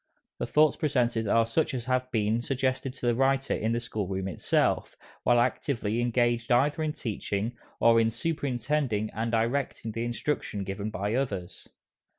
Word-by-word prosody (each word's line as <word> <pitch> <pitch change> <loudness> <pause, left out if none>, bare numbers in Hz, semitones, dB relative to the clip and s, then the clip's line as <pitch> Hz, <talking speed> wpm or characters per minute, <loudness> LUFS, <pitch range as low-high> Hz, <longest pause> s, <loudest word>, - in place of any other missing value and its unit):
The - - -2
thoughts 150 -1 +4
presented 120 -7 +1
are 115 +3 +4
such 140 +5 0
as 120 -2 -4
have 130 0 0
been 110 0 +1
suggested 130 +1 -1
to 130 - -7
the 120 - +3
writer 135 +2 +2
in 110 - 0
the 115 - +1
school 110 -4 -4
room 95 0 -2
itself, 85 - 0 0.3
while 120 -1 +4
actively 120 -3 0
engaged 120 0 +1
either 145 +6 +3
in 155 -1 0
teaching, 110 -1 -3 0.2
or 115 0 +6
in 115 - +3
superintending 125 -3 -1
and 115 +2 -2
directing 115 0 -1
the 115 +2 -3
instruction 120 -3 -2
given 100 +2 -4
by 100 0 -2
others. 100 -9 -3
120 Hz, 165 wpm, -28 LUFS, 110-130 Hz, 0.3 s, or